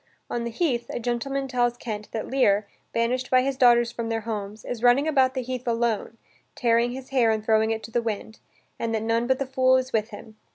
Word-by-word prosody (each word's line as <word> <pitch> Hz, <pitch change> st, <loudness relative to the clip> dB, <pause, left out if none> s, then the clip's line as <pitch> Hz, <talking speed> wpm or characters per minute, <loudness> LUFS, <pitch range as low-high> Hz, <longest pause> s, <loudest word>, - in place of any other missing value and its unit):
On 235 Hz, -1 st, -2 dB
the -, -, -2 dB
heath, 240 Hz, -3 st, -1 dB
a -, -, -3 dB
gentleman 260 Hz, +3 st, -2 dB
tells 245 Hz, -2 st, 0 dB
Kent 215 Hz, -3 st, -6 dB
that 220 Hz, -, -3 dB
Lear, 210 Hz, -6 st, +2 dB, 0.2 s
banished 250 Hz, +2 st, 0 dB
by 255 Hz, 0 st, +4 dB
his 275 Hz, 0 st, -1 dB
daughters 240 Hz, -2 st, +5 dB
from 230 Hz, -1 st, -4 dB
their 225 Hz, 0 st, -1 dB
homes, 210 Hz, -1 st, -5 dB
is 240 Hz, -2 st, -5 dB
running 250 Hz, +5 st, +4 dB
about 265 Hz, -4 st, +3 dB
the 260 Hz, -, -2 dB
heath 250 Hz, 0 st, -5 dB
alone, 230 Hz, -1 st, -1 dB, 0.4 s
tearing 235 Hz, 0 st, +2 dB
his 260 Hz, 0 st, -8 dB
hair 255 Hz, -4 st, +3 dB
and 220 Hz, -1 st, 0 dB
throwing 220 Hz, 0 st, +3 dB
it 225 Hz, 0 st, -2 dB
to 225 Hz, -, -9 dB
the 240 Hz, -, +1 dB
wind, 220 Hz, -1 st, -5 dB, 0.4 s
and 225 Hz, -1 st, -1 dB
that 220 Hz, -, -2 dB
none 230 Hz, +1 st, +1 dB
but 260 Hz, 0 st, +2 dB
the 275 Hz, -, -2 dB
fool 260 Hz, 0 st, +3 dB
is 260 Hz, 0 st, -3 dB
with 220 Hz, 0 st, 0 dB
him. 215 Hz, 0 st, -11 dB
235 Hz, 230 wpm, -25 LUFS, 225-255 Hz, 0.4 s, daughters